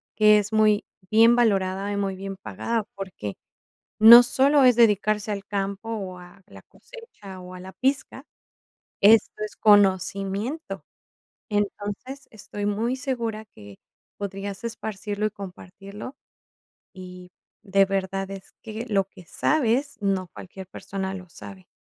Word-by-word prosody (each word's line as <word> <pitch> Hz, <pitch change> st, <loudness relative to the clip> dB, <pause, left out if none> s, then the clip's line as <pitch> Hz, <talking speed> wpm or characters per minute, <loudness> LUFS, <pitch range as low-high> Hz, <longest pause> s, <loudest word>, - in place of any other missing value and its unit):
que 210 Hz, -1 st, +6 dB
es 205 Hz, +1 st, -4 dB
muy 215 Hz, -1 st, +3 dB, 0.3 s
bien 230 Hz, +2 st, +6 dB
valorada 195 Hz, -4 st, +1 dB
y -, -, -2 dB
muy 195 Hz, -1 st, -2 dB
bien 195 Hz, 0 st, -7 dB
pagada. 225 Hz, +2 st, -3 dB
Porque 185 Hz, -, -7 dB, 0.6 s
no 235 Hz, +3 st, +11 dB
solo 275 Hz, +3 st, +3 dB
es 250 Hz, -2 st, +5 dB
dedicarse 215 Hz, -2 st, +2 dB
al 200 Hz, -1 st, -6 dB
campo, 200 Hz, +2 st, -4 dB
o, 195 Hz, -5 st, -5 dB
a 180 Hz, +1 st, -15 dB
la -, -, -14 dB
cosecha, 455 Hz, -, -13 dB
o, 180 Hz, 0 st, -10 dB
a 180 Hz, -, -9 dB
la 190 Hz, +1 st, -10 dB
pizca, 265 Hz, +1 st, -2 dB, 0.8 s
esto 215 Hz, +1 st, +4 dB
es 215 Hz, -, -7 dB
conocimiento. 200 Hz, -, +1 dB, 0.7 s
Entonces, 205 Hz, +6 st, -4 dB
estoy 205 Hz, -1 st, -7 dB
muy 220 Hz, +5 st, -1 dB
segura 235 Hz, -5 st, -3 dB
que 100 Hz, -, -15 dB, 0.4 s
podrías 200 Hz, 0 st, -6 dB
esparcirlo 210 Hz, -2 st, -4 dB
y -, -, -7 dB
compartirlo, 200 Hz, +3 st, -10 dB, 0.8 s
y 180 Hz, -1 st, -11 dB, 0.3 s
de 195 Hz, -1 st, +3 dB
verdad 195 Hz, 0 st, -3 dB
es 195 Hz, -1 st, -10 dB
que 225 Hz, +2 st, -6 dB
lo 200 Hz, -2 st, +2 dB
que 185 Hz, -2 st, -16 dB
sabes, 275 Hz, -, 0 dB
no 195 Hz, -3 st, -1 dB
cualquier 190 Hz, +1 st, -10 dB
persona 190 Hz, +1 st, -5 dB
lo 185 Hz, -2 st, -9 dB
sabe. 190 Hz, +1 st, -12 dB
205 Hz, 135 wpm, -24 LUFS, 195-225 Hz, 0.8 s, no